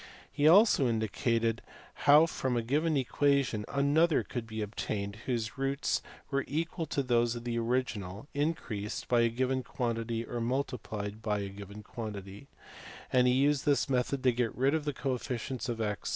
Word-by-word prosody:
He 145 - +2
also 180 - +6
indicated 115 +1 0 0.5
how 150 +3 +9
from 130 -6 -2
a 115 - 0
given 150 +6 +1
equation 135 -4 +1
another 145 +4 +3
could 120 -3 -5
be 110 -1 -3
obtained 100 -1 -4
whose 120 0 -2
roots 135 +1 0 0.3
were 140 -1 +1
equal 165 +2 -2
to 140 - -1
those 120 -2 +2
of 120 - -6
the 120 -1 -1
original 115 -3 -2
increased 135 -9 -2
by 120 -1 +3
a 115 - +3
given 130 +2 0
quan 120 -2 -2
tity 115 0 -3
or 120 - -3
multiplied 110 -4 -3
by 105 -2 -1
a 100 - -4
given 100 +1 -10
quantity: 105 +1 -7 0.7
and 125 -1 +5
he 125 - +4
used 140 +2 +2
this 145 -1 +3
method 130 0 0
to 130 - +5
get 120 -1 -1
rid 135 +3 +3
of 160 -2 0
the 145 - -1
cofficient 130 -1 -3
of 115 -1 -3
a? 105 -2 0
125 Hz, 170 wpm, -31 LUFS, 110-140 Hz, 0.7 s, how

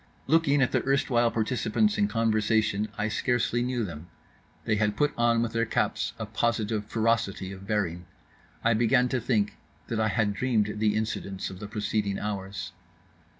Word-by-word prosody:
Looking 145 -3 +3
at 125 - +1
the - - +1
erstwhile 125 -3 +2
participants 125 - +1
in 205 -1 +2
conversation, 110 - +1
I 105 - 0
scarcely 120 +1 0
knew 125 -1 -1
them. 85 -4 -7 0.6
They 105 - +1
had 105 0 0
put 145 0 +2
on 120 -1 +3
with 115 - -3
their 115 0 +1
caps - - 0
a - - -4
positive 110 -2 -1
ferocity 110 -4 0
of 95 0 -10
bearing. 90 -5 -1 0.6
I 115 - +4
began 125 +3 +3
to 125 -1 -1
think 105 -5 0 0.3
that 115 - -1
I 110 - +2
had 105 -1 +1
dreamed 105 -2 0
the 105 -1 +2
incidents 100 -3 -3
of 95 - -9
the 105 - -6
preceding 105 -1 -1
hours. 100 -1 -4
110 Hz, 165 wpm, -27 LUFS, 105-120 Hz, 0.6 s, I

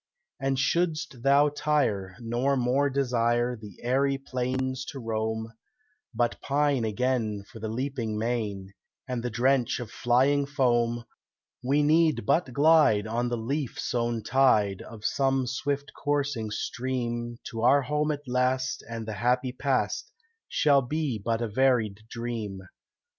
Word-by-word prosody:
And 135 -1 0
shouldst 160 -1 0
thou 140 +3 +5
tire, 140 -11 0
nor 125 +4 0
more 130 +3 +2
desire 120 -2 +1
The 105 -4 -12
airy 135 +3 +2
plains 130 0 -2
to - - -7
roam, 110 -1 -3 0.6
But 120 0 -1
pine 140 -3 +1
again 110 -2 -1
for 110 - -13
the 110 - -4
leaping 120 -2 -3
main 105 -4 -2 0.3
And 125 -2 -2
the 125 - -2
drench 125 +2 +1
of 120 -3 -7
flying 130 +4 +2
foam, 120 -4 +1 0.6
We 140 +4 +2
need 155 +1 +3
but 140 0 +2
glide 140 -7 +4
on 120 +2 -1
the 120 - -1
leaf 135 +4 -3
sown 120 -2 -1
tide 110 -5 +3
Of 110 -1 -10
some 135 -1 +1
swift 140 +2 -2
coursing 145 -6 -1
stream 120 +1 -3
To 115 - -4
our 135 +4 +5
home 150 +3 0
at 145 -1 -6
last, 130 +1 0
and 115 -1 -5
the 110 - -3
happy 125 +1 +2
past 135 +1 -1 0.4
Shall 140 -2 +3
be 140 -3 -2
but 115 +1 0
a - - -1
varied 110 -3 +2
dream." 115 -5 -4
125 Hz, 140 wpm, -27 LUFS, 115-140 Hz, 0.6 s, thou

